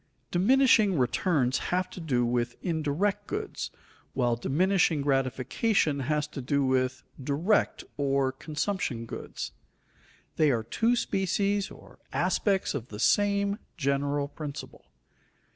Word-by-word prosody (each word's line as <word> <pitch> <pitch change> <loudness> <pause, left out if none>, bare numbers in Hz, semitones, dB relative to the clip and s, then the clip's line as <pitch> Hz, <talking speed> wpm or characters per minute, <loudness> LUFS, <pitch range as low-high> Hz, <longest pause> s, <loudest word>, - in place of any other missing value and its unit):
_ - - -44
Diminishing 215 -1 +4
returns 130 0 +1
have 180 +1 +1
to - - -8
do 125 -7 +1
with 120 0 0
indirect 165 +4 0
goods, - - -4 0.4
while 120 -2 +1
diminishing 160 +4 +2
gratification 140 - +1
has 150 +2 0
to 140 - -6
do 140 +2 +1
with 130 0 0 0.2
direct 160 +10 +1
or 140 -2 +1
consumption 150 - -3
goods. - - -6 0.9
They 155 -2 +4
are 115 -4 +1
two 225 - +1
species 200 -1 0
or - - -15
aspects 190 +2 +1
of 130 -5 -4
the 105 - -8
same 200 - +2 0.2
general 140 -1 0
principle. 145 -1 -8
145 Hz, 120 wpm, -28 LUFS, 130-190 Hz, 0.9 s, Diminishing